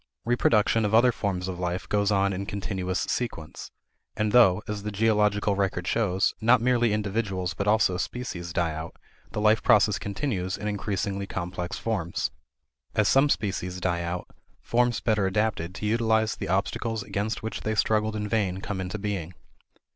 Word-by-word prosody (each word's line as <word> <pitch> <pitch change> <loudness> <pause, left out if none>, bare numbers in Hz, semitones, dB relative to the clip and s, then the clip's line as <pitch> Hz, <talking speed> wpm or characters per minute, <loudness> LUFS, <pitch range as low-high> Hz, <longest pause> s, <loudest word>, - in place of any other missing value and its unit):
Reproduction 115 -2 +3
of 105 +1 +2
other 120 +2 +6
forms 95 -5 -2
of 90 -2 -5
life 90 +1 -2
goes 100 0 +1
on 100 -1 +2
in 100 +1 -4
continuous 95 -2 -2
sequence. 95 -11 -4 0.5
And 105 0 0
though, 105 -4 +5
as 105 -1 -3
the 105 - -4
geological 105 -1 +2
record 95 -2 -1
shows, 95 -2 +1
not 120 +3 +5
merely 120 -1 +2
individuals 100 -3 -1
but 100 - -3
also 105 -4 +3
species 90 -7 -4
die 85 -2 0
out, 80 +1 -6 0.4
the - - -2
life 110 +1 +4
process 105 -3 +4
continues 100 -3 -2
in 105 - -4
increasingly 100 -1 -2
complex 90 -1 -4
forms. 95 -7 -2 0.6
As 105 -2 +3
some 135 +8 +4
species 95 -6 -1
die 85 -1 0
out, 85 +1 -4 0.3
forms 120 -1 +1
better 105 -4 +2
adapted 95 -3 -1
to 105 - -5
utilize 110 0 +2
the - - -5
obstacles 105 +3 -1
against 105 +3 -3
which 110 - -4
they 110 0 -1
struggled 110 +1 +1
in 105 0 -2
vain 100 -4 0
come 95 -1 -4
into 95 +3 -4
being. 95 -5 -4
105 Hz, 165 wpm, -26 LUFS, 95-110 Hz, 0.6 s, other